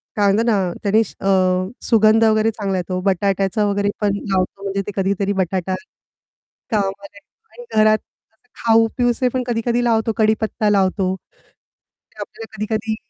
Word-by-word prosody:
काय 205 - +2
म्हणतात 225 +3 +1
ना, 195 -6 +1
त्याने 205 +2 +3
अ, 185 -3 +1 0.2
सुगंध 220 0 +5
वगैरे 220 0 +3
चांगला 200 -3 -3
येतो, 185 +1 -3
बटाट्याचा 195 +2 +1
वगैरे 205 0 0
पण 200 -1 +1
लावतो, 195 -1 -2
म्हणजे 195 0 -2
ते - - -3
कधीतरी 200 +1 0
बटाटा 185 -1 -1 1.0
कामाच्या 200 -1 -3 0.3
आणि 485 - -12 0.2
घरात 215 0 +5 0.4
असं 220 +3 -39 0.2
खाऊ 225 0 +5
पिऊसे 245 0 +1
पण 255 0 -2
कधी-कधी 240 0 0
लावतो, 225 -1 +1
कढीपत्ता 220 -1 +1
लावतो. 190 -1 +1
ते - - -27
आपल्याला 225 -1 -9
कधी-कधी 220 +1 -2
205 Hz, 140 wpm, -20 LUFS, 195-225 Hz, 1.0 s, सुगंध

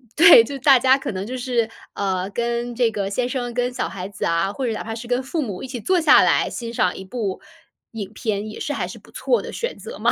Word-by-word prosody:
对， 330 -7 +9
就 275 +4 -6
大 270 0 +6
家 260 +2 +5
可 270 - -4
能 190 -1 -4
就 255 +2 -4
是， 245 -3 0 0.3
呃， 190 -1 -1
跟 235 +2 -2
这 235 -1 +2
个 200 -2 -2
先 245 +5 -1
生 245 -2 -3
跟 245 +1 0
小 250 - -2
孩 185 -1 -6
子 200 - -4
啊， 170 +3 +1
或 265 - -3
者 230 - -1
哪 - - -5
怕 225 0 -5
是 235 +1 -8
跟 245 +1 0
父 305 +5 -2
母 205 -9 -5
一 - - -5
起 250 -1 -5
坐 370 - +2
下 305 -2 +7
来 - - +2
欣 235 -1 -6
赏 180 -6 +1
一 190 - -8
部 200 -2 -4 0.5
影 210 -4 -6
片， 215 -2 -3
也 215 - -9
是 295 - -3
还 - - -2
是 - - -9
不 - - -20
错 485 - 0
的 - - -7
选 480 +1 -4
择 - - -9
嘛。 - - +3
235 Hz, 285 characters per minute, -22 LUFS, 205-260 Hz, 0.5 s, 对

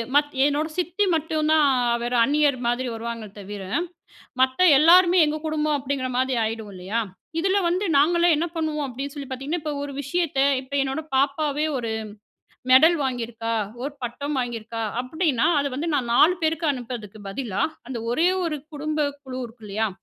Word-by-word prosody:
மத் 290 0 +3
என்னோட 295 +2 +1
சித்தி 360 +3 0
மட்டும்தான். 310 -1 +2 0.3
அவர் 240 +1 -3
அந்நியர் 290 0 +2
மாதிரி 245 +2 0
வருவாங்களே 225 -2 -6
தவிர, 205 0 -7 0.8
மத்த 260 0 +3 0.2
எல்லோருமே 350 +4 +6
எங்க 300 +1 -1
குடும்பம் 305 -1 0
அப்படிங்கிற 270 -1 -2
மாதிரி 260 +1 +1
ஆயிடும் 220 -1 -4
இல்லையா! 190 +5 -2 0.4
இதுல 385 +3 +2
வந்து 365 +4 0
நாங்களே 340 +4 +4
என்ன 330 - 0
பண்ணுவோம் 305 -3 -1
அப்படின்னு 270 +3 -6
சொல்லி 280 -3 -7
பாத்தீங்கன்னா, 275 +6 -3
இப்போ 305 - -3
ஒரு 285 0 -5
விஷயத்த 290 +1 -2 0.2
இப்போ 270 +2 -9
என்னோட 270 +3 -2
பாப்பாவே, 285 +2 +1
ஒரு 235 -3 -3 0.8
மெடல் 315 +7 +7
வாங்கியிருக்கா, 230 -3 -3 0.3
ஒரு 285 +2 -3
பட்டம் 275 +4 -3
வாங்கியிருக்கா, 230 -2 -4 0.2
அப்படின்னா, 275 -2 0
அதை 280 - -1
வந்து 310 +5 -2
நான் 245 -4 -1
4 325 +8 +6
பேருக்கு 325 +1 0
அனுப்பறதுக்கு 230 -5 -7
பதிலா, 210 -2 -3 0.3
அந்த 250 -3 -4
ஒரே 325 +8 +3 0.2
1 310 -3 -2 0.2
குடும்ப 300 0 -1
குழு 255 -1 -7
இருக்கு 230 -1 -12
இல்லயா? 215 +2 0
275 Hz, 155 wpm, -24 LUFS, 240-310 Hz, 0.8 s, மெடல்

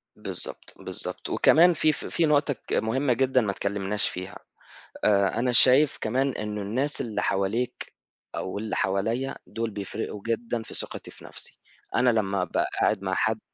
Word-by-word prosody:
بالضبط، - - -4
بالضبط، - - -4
وكمان 175 +3 +5
في 155 -1 +3
ف - - -6
في 170 - +1
نقطة 145 -1 +3
ك - - -4
مهمة 125 +5 +1
جدًا 130 +1 +2
ما 105 -3 0
اتكلّمناش 100 +1 0
فيها، 90 +1 -7 0.7
آآ 100 +1 +3
أنا 125 +1 +1
شايف 130 +4 +6
كمان 130 +5 +1
إنه 105 -3 -4
الناس 130 +9 0
اللي 110 -3 -2
حواليك 100 +6 -1 0.4
أو 95 - -4
اللي 110 0 -3
حواليّا 110 +7 0
دُول 115 +1 -3
بيفرقوا 100 +1 -5
جدًا 115 0 -1
في - - -11
ثقتي - - -4
في - - -14
نفْسي، - - -7 0.4
أنا 125 - +4
لمّا 100 -4 +1
أبقى 90 - -1
قاعد 105 - +2
مع 95 -1 -1
حد 110 +3 +1
110 Hz, 165 wpm, -26 LUFS, 100-130 Hz, 0.7 s, شايف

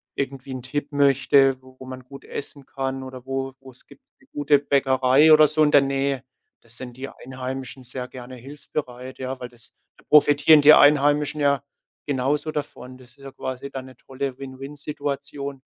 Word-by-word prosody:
irgendwie 135 -1 -5
'n 130 - -7
Tipp 145 +3 -4
möchte, 135 -1 +3
wo 130 0 -18
wo 130 - -10
man 130 0 -8
gut 140 +2 -13
essen 140 -1 -8
kann 135 0 -4
oder 130 -1 -10
wo 135 0 -3
wo 135 0 -14
es 125 - -23
gibt, - - -18 0.2
'ne - - -26
gute 145 0 +3
Bäckerei 140 +1 +3
oder 155 0 +8
so 155 +1 +2
in 150 - +4
der 145 - +7
Nähe. 135 -1 -1 0.4
Da 115 - -25
sind 125 +1 -10
die 135 +2 -7
Einheimischen 130 0 -7
sehr 125 0 -7
gerne 125 0 -10
hilfsbereit, 130 -1 -7
ja, 130 0 -5
weil 125 - -7
das 120 -1 -19 0.3
da - - -22
profitieren 150 +1 +6
die 150 +2 +9
Einheimischen 145 +1 +3
ja 140 -1 +2 0.4
genauso 145 +3 -1
davon. 130 -4 -7
Das 125 -1 -17
ist 125 - -28
ja 135 - -9
quasi 130 +1 -6
dann 135 -1 -7
'ne 130 -1 -14
tolle 135 0 -6
Win-Win-Situation. 140 0 -6
135 Hz, 185 wpm, -23 LUFS, 130-145 Hz, 0.4 s, die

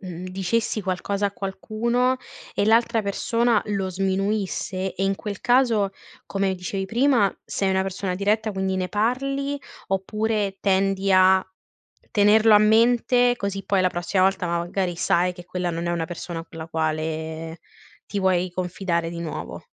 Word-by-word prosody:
mhmm, 180 -2 -7
dicessi 205 +4 -1
qualcosa 195 +2 -1
a 200 - -4
qualcuno 230 +6 -1 0.4
e 205 - +1
l'altra 230 0 +3
persona 230 +2 +1
lo 195 -2 -1
sminuisse 190 0 -1
e, 195 - -1
in 195 0 +1
quel 205 -2 -6
caso, 240 -5 +3 0.4
come 195 -1 0
dicevi 190 +1 -4
prima, 235 -2 +2
sei 195 -1 -1
una 190 0 +2
persona 190 -1 -3
diretta 210 +3 0
quindi 190 0 -1
ne 185 -1 -1
parli, 275 +6 -1 0.3
oppure 205 +1 -1
tendi 195 0 +1
a 185 0 +5 0.7
tenerlo 215 +1 +5
a - - +9
mente, 240 +3 +4
così 195 -1 -4
poi 195 -2 +2
la 185 - +3
prossima 180 +2 0
volta 190 -1 +2
magari 175 +1 -1
sai 180 +1 +2
che 175 -1 -12
quella 180 -1 -3
non 170 +1 -3
è - - 0
una 165 -2 -1
persona 170 -1 -6
con 165 - -13
la 160 - -6
quale 160 +1 -3 0.5
ti 205 - -3
vuoi 185 -1 +1
confidare 175 -1 -2
di 170 0 -6
nuovo? 165 -2 -6
195 Hz, 155 wpm, -24 LUFS, 180-215 Hz, 0.7 s, a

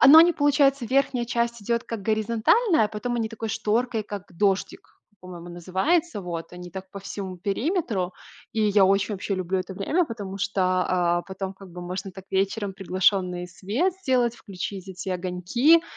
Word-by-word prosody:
А, - - +8
ну 305 +4 +11
они 340 +1 +8
получается 280 -3 +3
верхняя 260 -1 +2
часть 235 -1 -1
идёт, 235 +2 0
как 225 -4 -5
горизонтальная, 230 - +3
а - - -1
потом 240 +3 -3
они 225 -1 0
такой 225 0 -5
шторкой, 225 +2 0
как 205 -2 -6
дождик, 195 +2 -1 0.2
он 205 - -37
по-моему, 175 0 -9
называется, 200 - 0
вот. 170 -2 -5
Они 180 0 -9
так 190 +1 -7
по 200 - -7
всему 190 -1 -6
периметру. 200 - -1 0.4
И 225 - -1
я 205 -2 +5
очень, 195 +2 +2
вообще, 195 +1 -2
люблю 185 0 -1
это 185 +1 -5
время, 315 - +1
потому 200 -6 -6
что, 200 0 -1 0.3
а, 175 -1 +2
потом, 190 0 -5
как 190 -2 -13
бы, 180 +1 -8
можно 185 +2 -5
так 190 0 -11
вечером 195 +1 0
приглушённый 185 -1 +1
свет 220 - 0
сделать, 255 -10 +1
включить 195 -2 -6
эти 185 0 -6
огоньки 185 - +3
200 Hz, 175 wpm, -25 LUFS, 185-240 Hz, 0.4 s, ну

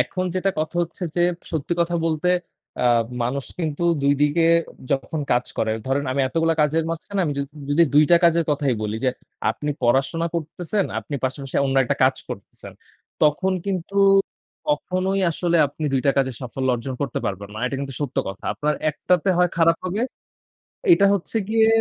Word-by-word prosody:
এখন 185 -1 -1
যেটা 185 +1 +1
কথা 155 +2 -2
হচ্ছে 170 +2 -7
যে, - - +2 0.3
সত্যি 160 +1 -2
কথা 170 0 +1
বলতে, 165 +2 0 0.5
আ - - 0 0.4
মানুষ 130 +3 -2
কিন্তু 160 -2 -2 0.2
২ 140 0 +4
দিকে 150 +3 +3 0.5
যখন 140 +3 -1
কাজ 120 0 +2
করে। 110 -1 +1
ধরেন 135 +2 0
আমি 140 - 0
এতগুলা 165 +1 +1
কাজের 155 +2 +2
মাঝখানে, 180 +4 -3
আমি 150 - -1
য - - +1 0.3
যদি 150 +4 +5
২ 150 +1 +7
টা 170 - +8
কাজের 170 0 +4
কথাই 145 -3 +1
বলি 105 0 -2
যে, 130 - +4 0.4
আপনি 150 - -3
পড়াশোনা 135 +7 +2
করতেছেন, 170 +5 -2
আপনি 115 +6 -6
পাশাপাশি 135 +1 -3
অন্য 135 0 0
একটা - - -1
কাজ - - +3
করতেছেন। - - -9 0.5
তখন 155 +6 +3
কিন্তু 190 -1 -3 0.7
কখনোই 190 -8 0
আসলে 170 +1 0
আপনি, 145 +2 -7
২ 135 - +2
টা 140 - +6
কাজে 130 -1 +1
সাফল্য 130 +1 -3
অর্জন 125 +2 -4
করতে 140 -4 -2
পারবেন 100 +1 -4
না। - - -6
এটা 135 +1 -3
কিন্তু 135 -1 -5
সত্য 140 -3 -3
কথা। 95 0 -8
আপনার 150 0 0 0.2
একটাতে 180 +4 0
হয় 180 0 +4
খারাপ 165 0 +4
হবে 195 +5 -1 0.9
এটা 200 -12 +6
হচ্ছে 200 +3 -3
গিয়ে, 220 0 +4
155 Hz, 175 wpm, -22 LUFS, 135-175 Hz, 0.9 s, টা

